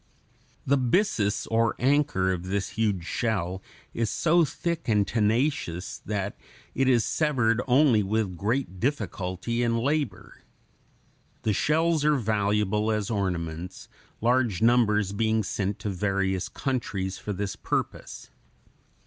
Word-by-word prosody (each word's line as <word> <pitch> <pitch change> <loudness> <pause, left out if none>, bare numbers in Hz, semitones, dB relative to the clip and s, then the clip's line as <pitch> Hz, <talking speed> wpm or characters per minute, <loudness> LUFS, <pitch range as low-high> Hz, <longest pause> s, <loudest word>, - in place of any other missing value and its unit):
The 140 +1 +3
byssus 120 - +1
or 115 0 +2
anchor 135 -8 +2
of 90 -1 -3
this 100 0 -1
huge 105 -6 -1
shell 95 -4 -2 0.3
is 115 -2 -1
so 170 - +3
thick 165 0 -3
and 105 -2 +3
tenacious 110 - 0
that 100 -1 -2 0.4
it 135 0 +2
is 120 -3 +3
severed 125 -3 +1
only 125 -3 +5
with 100 -2 -1
great 105 +1 -2
difficulty 115 -3 -2
and 115 -1 +1
labor. 140 -5 -2 1.0
The 110 - +1
shells 160 - +2
are 150 0 +4
valuable 105 -2 +1
as 105 0 -1
ornaments, 90 -3 -3 0.3
large 120 -4 +2
numbers 110 -4 +3
being 110 +1 +1
sent 100 +1 -2
to 105 - -2
various 95 -1 -1
countries 100 -8 -3
for 105 - -5
this 100 0 -3
purpose. - - -4
110 Hz, 125 wpm, -26 LUFS, 100-125 Hz, 1.0 s, only